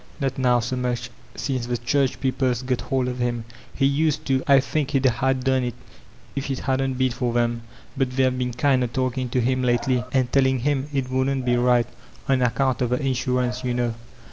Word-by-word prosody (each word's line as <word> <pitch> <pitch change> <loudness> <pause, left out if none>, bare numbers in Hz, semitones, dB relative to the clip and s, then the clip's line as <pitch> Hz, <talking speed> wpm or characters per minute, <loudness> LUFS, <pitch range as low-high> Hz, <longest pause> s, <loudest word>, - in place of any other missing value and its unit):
"Not 135 -2 -2
now 125 -2 +3
so 120 +3 -2
much, 125 -1 -2 0.2
since 130 -4 -2
the 120 0 -1
church 135 +3 0
people's 130 -2 0
got 125 -1 -1
hold 130 -1 -1
of 125 0 -4
him. 120 -2 -1 0.3
He 135 - +2
used 150 +2 +1
to; 135 -1 +1
I 140 -1 +7
think 140 +1 -1
he'd 135 -2 +1
a 130 +2 +3
done 130 0 +1
it 120 -2 -3 0.6
if 140 0 -3
it 135 - -1
hadn't 135 0 0
been 130 0 +1
for 120 0 -2
them. 120 -1 +1 0.3
But 135 -2 0
they've 130 -1 +3
been 125 -1 -2
kind 130 +1 +2
o' - - 0
taOcin' 130 +1 -2
to 125 - 0
him 130 +2 +1
htely, 125 0 +1
and 130 -2 +1
teOin' 130 -2 +3
him 140 0 0
it 135 -3 -2
wouldn't 130 0 0
be 120 -1 +3
right,— 120 -1 +3 0.4
on 135 -2 +2
account 125 +1 +1
of 125 - +1
the 125 - +1
insurance, 125 -2 -1
yoo 125 -1 -1
know." 120 -1 0
130 Hz, 210 wpm, -23 LUFS, 125-135 Hz, 0.6 s, I